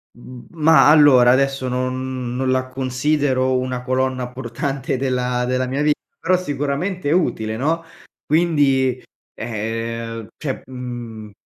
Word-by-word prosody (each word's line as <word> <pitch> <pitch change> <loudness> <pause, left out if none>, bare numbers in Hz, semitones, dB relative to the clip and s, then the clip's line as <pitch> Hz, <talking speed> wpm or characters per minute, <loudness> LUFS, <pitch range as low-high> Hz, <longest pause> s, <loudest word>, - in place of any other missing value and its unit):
Mhmm, 120 +1 -12
ma 160 -1 +5
allora 145 -5 +7
adesso 135 0 +1
non 130 0 -3
non 130 +1 -1
la 130 0 +1
considero 130 0 0
una 125 -1 -3
colonna 130 -1 -1
portante 130 +2 -3
della 125 -1 -1
della 130 +1 0
mia 135 +3 -2
vita, 150 0 +2 0.2
però, 185 +2 +2
sicuramente, 145 +2 -2
è - - +2
utile, 115 -10 0
no, 160 +6 0 0.4
quindi, 140 -6 +2 0.3
ehm 115 0 -4
cioè, 135 -4 -4
mhmm, 120 -4 -7
130 Hz, 125 wpm, -20 LUFS, 125-140 Hz, 0.4 s, allora